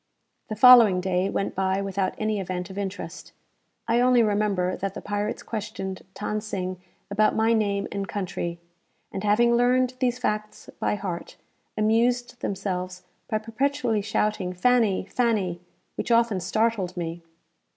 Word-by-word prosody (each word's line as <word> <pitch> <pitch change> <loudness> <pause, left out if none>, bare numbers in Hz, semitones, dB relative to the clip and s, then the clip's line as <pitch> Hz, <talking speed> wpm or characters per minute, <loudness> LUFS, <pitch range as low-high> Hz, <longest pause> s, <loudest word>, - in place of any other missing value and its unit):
The 215 - -3
following 230 -5 +8
day 185 +1 0
went 195 - -2
by 190 0 0
without 195 -1 -2
any 215 -1 -1
event 185 0 -4
of 190 - -10
interest. 200 0 -6 0.5
I 230 +1 +3
only 250 -1 +5
remember 205 -4 +1
that 195 0 -4
the - - -4
pirates 205 +1 -3
questioned 195 -3 -5 0.2
Than 215 0 -2
Sing 185 -3 -4 0.3
about 215 +1 +3
my 225 +1 +3
name 200 -3 0
and 200 -1 -3
country; 175 -3 -4 0.5
and, 195 - -5
having 230 +3 +4
learned 250 +1 +3
these 250 -1 +1
facts 215 -3 -3
by - - 0
heart, 185 -4 -6 0.4
amused 240 +3 +1
themselves 185 -2 -3 0.3
by 215 - +1
perpetually 225 +1 -1
shouting 205 -3 -1
"Fanny! 215 0 +2
Fanny!" 200 -7 0 0.4
which - - -3
often 230 -4 +3
startled 190 -1 0
me. 170 0 -4
205 Hz, 140 wpm, -25 LUFS, 190-230 Hz, 0.5 s, following